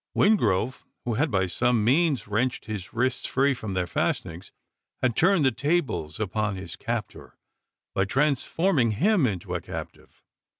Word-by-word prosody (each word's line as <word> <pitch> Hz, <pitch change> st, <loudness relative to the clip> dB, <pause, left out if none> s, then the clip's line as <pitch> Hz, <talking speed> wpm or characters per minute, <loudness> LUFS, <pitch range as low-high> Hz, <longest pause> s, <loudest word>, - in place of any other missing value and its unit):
Wingrove, 120 Hz, -, +2 dB, 0.2 s
who 120 Hz, -, 0 dB
had 145 Hz, +7 st, +1 dB
by 95 Hz, -4 st, +1 dB
some 115 Hz, +5 st, +1 dB
means 135 Hz, -1 st, +2 dB
wrenched 120 Hz, +5 st, -1 dB
his 105 Hz, -4 st, -6 dB
wrists 130 Hz, +2 st, -1 dB
free 140 Hz, +2 st, +2 dB
from 110 Hz, -6 st, -5 dB
their 90 Hz, -1 st, +1 dB
fastenings, 85 Hz, 0 st, -2 dB, 0.5 s
had 125 Hz, -3 st, +1 dB
turned 175 Hz, -3 st, +4 dB
the 130 Hz, -, +4 dB
tables 130 Hz, -, -1 dB
upon 105 Hz, 0 st, -1 dB
his 95 Hz, -2 st, -7 dB
captor, 115 Hz, 0 st, -5 dB, 0.6 s
by 95 Hz, -, +1 dB
transforming 140 Hz, -, +1 dB
him 180 Hz, -, +3 dB
into 95 Hz, -6 st, -4 dB
a -, -, -2 dB
captive! -, -, -9 dB
120 Hz, 145 wpm, -26 LUFS, 100-140 Hz, 0.6 s, turned